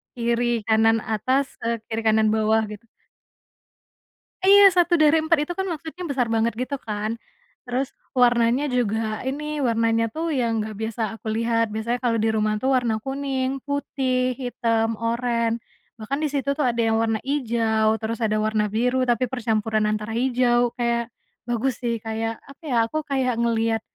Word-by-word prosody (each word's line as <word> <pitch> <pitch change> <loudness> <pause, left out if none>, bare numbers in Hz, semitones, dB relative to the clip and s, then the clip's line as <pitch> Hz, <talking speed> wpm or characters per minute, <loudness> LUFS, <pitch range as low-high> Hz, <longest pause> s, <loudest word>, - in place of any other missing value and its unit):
kiri, 235 0 0 0.2
kanan, 225 0 +4
atas, 260 +6 +1 0.2
eee, 230 0 0
kiri, 225 0 -3
kanan, 220 0 +4
bawah 220 0 +2
git 210 +1 -9 1.6
Iya 395 0 +7
1 350 -1 +3
dari 310 0 +4
4 315 +1 +2
itu 350 - -4
kan 385 +2 -3
maksudnya 330 +2 -6
besar 255 -4 0
banget 225 0 +1
gitu 255 +3 -2
kan, 215 +1 -3 0.5
terus 260 +2 -2 0.2
warnanya 245 +2 +3
juga 220 -3 -1
ini 300 +2 -3
warnanya 230 -2 +1
tuh 320 +6 -3
yang 235 -4 0
enggak 215 0 -6
biasa 225 +1 -3 0.2
aku - - -10
lihat 230 -1 +1
biasanya 220 +3 -2
kalau 235 -2 +1
di 220 +1 +1
rumah 215 -1 +1
tuh 265 +4 +1
warna 240 -4 +1
kuning, 270 -1 -2
putih, 260 -3 -1
hitam, 230 -3 -1
oren, 230 0 0 0.4
bahkan 220 +6 -3
di - - +2
situ 280 0 -1
tuh 295 - +1
ada 235 -1 +1
yang 225 -1 +2
warna 225 -1 0
hijau 230 -5 0
terus 225 +1 -3
ada 215 0 0
warna 215 0 +1
biru 250 +3 +1
tapi 240 0 +1
percampuran 220 -3 0
antara 215 +1 -2
hijau 245 -1 +2
kayak 235 -1 -1 0.3
bagus 240 +1 -1
sih 235 -2 -2
kayak 225 0 -3
apa 275 +3 -16
ya, 255 - -1
aku 310 - -4
kayak 260 -4 0
ngelihat, 225 -1 +1
235 Hz, 165 wpm, -23 LUFS, 225-260 Hz, 1.6 s, Iya